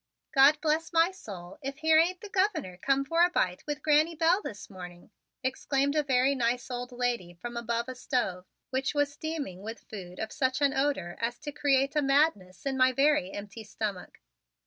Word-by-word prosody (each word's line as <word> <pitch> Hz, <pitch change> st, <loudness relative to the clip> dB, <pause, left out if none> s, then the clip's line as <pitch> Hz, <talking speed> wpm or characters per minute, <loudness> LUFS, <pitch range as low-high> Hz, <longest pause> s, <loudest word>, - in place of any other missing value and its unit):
"God 280 Hz, +2 st, +6 dB
bless 320 Hz, +2 st, 0 dB
my 335 Hz, +2 st, +4 dB
soul, 190 Hz, -, -10 dB
if 275 Hz, 0 st, -5 dB
here 315 Hz, 0 st, +5 dB
ain't 355 Hz, +2 st, +1 dB
the 420 Hz, -, -9 dB
Governor 370 Hz, -, 0 dB
come 275 Hz, +8 st, +1 dB
for 330 Hz, +4 st, +3 dB
a 350 Hz, -, +5 dB
bite 185 Hz, -, 0 dB
with 295 Hz, 0 st, -4 dB
Granny 310 Hz, +2 st, +3 dB
Bell 335 Hz, +5 st, +3 dB
this 210 Hz, -, -7 dB
fine 200 Hz, -, -17 dB
morning!" 180 Hz, -1 st, -10 dB, 0.3 s
exclaimed 275 Hz, +2 st, 0 dB
a 305 Hz, -, +4 dB
very 265 Hz, -1 st, +2 dB
nice 245 Hz, 0 st, -1 dB
old 245 Hz, +1 st, -4 dB
lady 240 Hz, -8 st, -2 dB
from 240 Hz, +7 st, -7 dB
above 235 Hz, 0 st, -2 dB
a 255 Hz, -, -4 dB
stove, 240 Hz, -8 st, -2 dB, 0.2 s
which 270 Hz, +3 st, -1 dB
was 290 Hz, 0 st, +1 dB
steaming 290 Hz, -, -5 dB
with 225 Hz, +3 st, -8 dB
food 180 Hz, -4 st, -8 dB
of 220 Hz, -, -4 dB
such 260 Hz, 0 st, 0 dB
an 280 Hz, -2 st, +3 dB
odor 270 Hz, -12 st, -1 dB
as 235 Hz, +1 st, -1 dB
to 295 Hz, -2 st, -5 dB
create 275 Hz, -1 st, +1 dB
a 300 Hz, -, +3 dB
madness 275 Hz, -, +1 dB
in 270 Hz, -1 st, -1 dB
my 255 Hz, 0 st, +5 dB
very 275 Hz, -6 st, +2 dB
empty 205 Hz, +3 st, -8 dB
stomach. 205 Hz, -2 st, -5 dB
265 Hz, 195 wpm, -29 LUFS, 220-300 Hz, 0.3 s, God